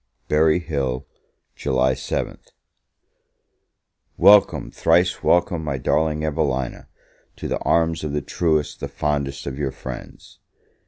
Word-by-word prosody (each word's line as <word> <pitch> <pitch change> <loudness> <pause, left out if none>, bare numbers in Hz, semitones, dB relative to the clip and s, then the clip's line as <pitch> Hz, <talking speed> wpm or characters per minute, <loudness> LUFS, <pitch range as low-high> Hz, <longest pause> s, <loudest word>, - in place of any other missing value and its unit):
Berry 80 +2 +3
Hill, 70 -7 -2 0.5
July 65 -1 +1
7th. - - -4 1.7
WELCOME, 105 0 +5
thrice 85 +2 +2
welcome, 85 -1 +2
my 70 -3 -2
darling 75 +3 0
Evelina, 70 -5 -2 0.5
to - - -6
the - - -2
arms 80 -1 +1
of 75 - -3
the 75 -1 -2
truest, 80 -4 0
the - - -4
fondest 70 -2 -2
of 70 0 -5
your 70 -2 0
friends! - - -10
75 Hz, 115 wpm, -22 LUFS, 70-80 Hz, 1.7 s, WELCOME